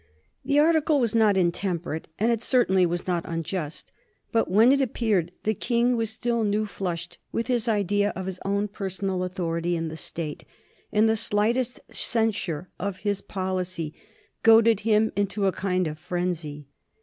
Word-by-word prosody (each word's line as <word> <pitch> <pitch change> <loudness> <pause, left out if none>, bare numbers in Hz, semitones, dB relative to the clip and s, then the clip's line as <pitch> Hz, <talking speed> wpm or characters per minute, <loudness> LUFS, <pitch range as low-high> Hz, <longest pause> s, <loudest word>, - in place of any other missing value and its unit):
The 285 +2 +1
article 310 -1 +4
was 235 -4 +1
not 215 -3 +4
intemperate 175 -2 -1
and 225 +3 +2
it 230 -2 0
certainly 190 -8 +3
was 175 +1 -3
not 175 -2 0
unjust. 165 -1 -4 0.4
But 225 -1 +1
when 220 +7 +6
it 275 0 +3
appeared 215 -9 0
the 215 - +1
King 240 +3 +1
was 225 -2 -1
still 235 +1 -1
new 210 +1 +1
flushed 175 -3 -5
with 230 - -1
his 245 -3 0
idea 205 -1 +2
of 190 +1 -4
his 185 -1 -5
own 200 +1 0
personal 190 -2 -3
authority 175 -2 -2
in 165 0 -3
the 160 - -7
State, 160 -2 -5 0.5
and 215 +1 +4
the 220 - +3
slightest 230 +3 +1
censure 200 -8 0
of 200 -1 -3
his 205 -1 0
policy 185 -4 -3 0.5
goaded 225 -1 +6
him 220 0 +2
into 200 0 0
a 190 - +3
kind 185 -1 -1
of 155 -1 -5
frenzy. 170 -4 -3
200 Hz, 160 wpm, -26 LUFS, 175-225 Hz, 0.5 s, when